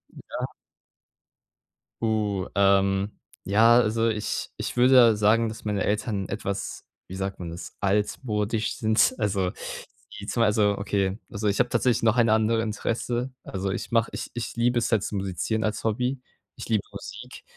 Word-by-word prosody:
Ja. -, -, -5 dB, 1.5 s
Uh, 105 Hz, -4 st, 0 dB
ähm, 100 Hz, 0 st, +3 dB, 0.3 s
ja, 115 Hz, +5 st, +5 dB
also, 115 Hz, 0 st, +2 dB
ich 110 Hz, -2 st, -2 dB
ich -, -, -4 dB
würde 120 Hz, -3 st, +6 dB
sagen, 110 Hz, +2 st, +3 dB
dass 110 Hz, +1 st, -9 dB
meine 105 Hz, -3 st, 0 dB
Eltern 105 Hz, -2 st, -1 dB
etwas- 100 Hz, 0 st, -4 dB, 0.2 s
wie 95 Hz, -, -8 dB
sagt 95 Hz, 0 st, -4 dB
man 85 Hz, -2 st, -5 dB
das- 85 Hz, +2 st, -8 dB
altmodisch 105 Hz, +2 st, 0 dB
sind. 110 Hz, +3 st, +3 dB
Also, 95 Hz, -3 st, 0 dB, 0.7 s
die -, -, -8 dB
2 115 Hz, -2 st, +2 dB
so 105 Hz, -1 st, +2 dB
okay. 100 Hz, -1 st, -1 dB
Also, 105 Hz, 0 st, -3 dB
ich 100 Hz, -, +1 dB
habe 125 Hz, 0 st, +3 dB
tatsächlich 120 Hz, -1 st, +1 dB
noch 115 Hz, -1 st, +4 dB
ein 115 Hz, -2 st, +4 dB
andere 110 Hz, +1 st, +3 dB
Interesse. 120 Hz, +3 st, -2 dB
Also, 95 Hz, 0 st, -3 dB
ich 95 Hz, -, -5 dB
mache 115 Hz, -1 st, +2 dB
ich -, -, -5 dB
ich 115 Hz, -1 st, -4 dB
liebe 120 Hz, +1 st, +2 dB
es 115 Hz, -, -1 dB
halt 105 Hz, -3 st, +2 dB
zu -, -, -4 dB
musizieren 100 Hz, +3 st, -2 dB
als 110 Hz, -1 st, -2 dB
Hobby. 125 Hz, +4 st, -1 dB, 0.3 s
Ich -, -, -8 dB
liebe 110 Hz, -3 st, +2 dB
Musik. -, -, -9 dB
110 Hz, 160 wpm, -26 LUFS, 100-115 Hz, 1.5 s, würde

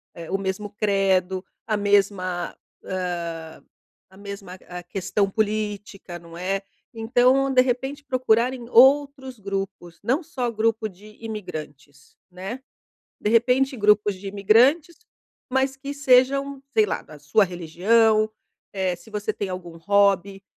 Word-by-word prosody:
eh, 170 Hz, 0 st, -8 dB
o 195 Hz, -, +1 dB
mesmo 195 Hz, +2 st, -3 dB
credo, 195 Hz, -3 st, +1 dB, 0.2 s
a 215 Hz, -, +1 dB
mesma 195 Hz, -3 st, +1 dB, 0.3 s
hã, 170 Hz, -3 st, -5 dB, 0.5 s
a 190 Hz, -, -19 dB
mesma 200 Hz, -1 st, -8 dB, 0.2 s
a 180 Hz, 0 st, -6 dB
questão 195 Hz, +2 st, -1 dB
política, 205 Hz, -3 st, -3 dB
não 170 Hz, 0 st, -13 dB
é? 195 Hz, +2 st, -1 dB, 0.3 s
Então, 250 Hz, +4 st, +3 dB
de 255 Hz, -, +6 dB
repente, 265 Hz, +3 st, -2 dB
procurar 255 Hz, -2 st, +2 dB
em 240 Hz, -2 st, -9 dB
outros 265 Hz, 0 st, +4 dB
grupos, 195 Hz, -3 st, -5 dB
não 260 Hz, -, 0 dB
só 260 Hz, -7 st, -3 dB
grupo 220 Hz, 0 st, 0 dB
de 210 Hz, +2 st, -15 dB
imigrantes, 155 Hz, -11 st, -8 dB, 0.2 s
né? 190 Hz, +8 st, -7 dB, 0.6 s
De 210 Hz, -, 0 dB
repente 250 Hz, +4 st, +3 dB
grupos 210 Hz, -1 st, +3 dB
de 190 Hz, +2 st, -9 dB
imigrantes, 245 Hz, -, +3 dB, 0.5 s
mas 265 Hz, +1 st, 0 dB
que 280 Hz, +1 st, -6 dB
sejam, 275 Hz, 0 st, +3 dB
sei 435 Hz, -, +5 dB
lá, -, -, -3 dB
da 155 Hz, -, -14 dB
sua 145 Hz, +9 st, +2 dB
religião. 215 Hz, +6 st, +2 dB, 0.4 s
Eh, 190 Hz, -2 st, -1 dB
se 175 Hz, +5 st, -17 dB
você 210 Hz, 0 st, -2 dB
tem 205 Hz, -2 st, -4 dB
algum 180 Hz, -2 st, -7 dB
hobby, 200 Hz, +1 st, +2 dB
205 Hz, 135 wpm, -24 LUFS, 185-245 Hz, 0.6 s, de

